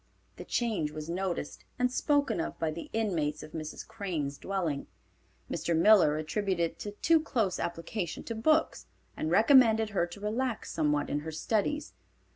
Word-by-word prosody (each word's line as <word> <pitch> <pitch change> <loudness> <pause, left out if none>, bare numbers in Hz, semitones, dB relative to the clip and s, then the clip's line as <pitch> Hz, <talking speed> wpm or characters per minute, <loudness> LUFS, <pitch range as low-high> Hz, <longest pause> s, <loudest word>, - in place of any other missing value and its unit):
The - - -8
change 220 -11 0
was 155 +2 -6
noticed 180 -4 -3
and 250 0 +1
spoken 285 - +1
of - - -5
by 160 -1 -1
the 165 +2 -7
inmates 165 -9 -1
of - - -10
Mrs. 155 -1 -6
Crane's 155 -8 -4
dwelling. 175 -8 -2 0.6
Mr. 170 -1 -1
Miller 170 -5 +6
attributed 170 +1 -1
it - - -27
to 210 - -5
a - - -9
too 325 +9 +3
close 225 - -1
application 170 +2 -4
to 230 - -4
books, 310 +8 +1 0.3
and 155 - -2
recommended 225 - +5
her 175 -4 +1
to 175 +3 -10
relax 225 +3 -2
somewhat 150 -2 +1
in 145 - 0
her 160 +2 -6
studies. 220 - -1
190 Hz, 165 wpm, -30 LUFS, 160-225 Hz, 0.6 s, Miller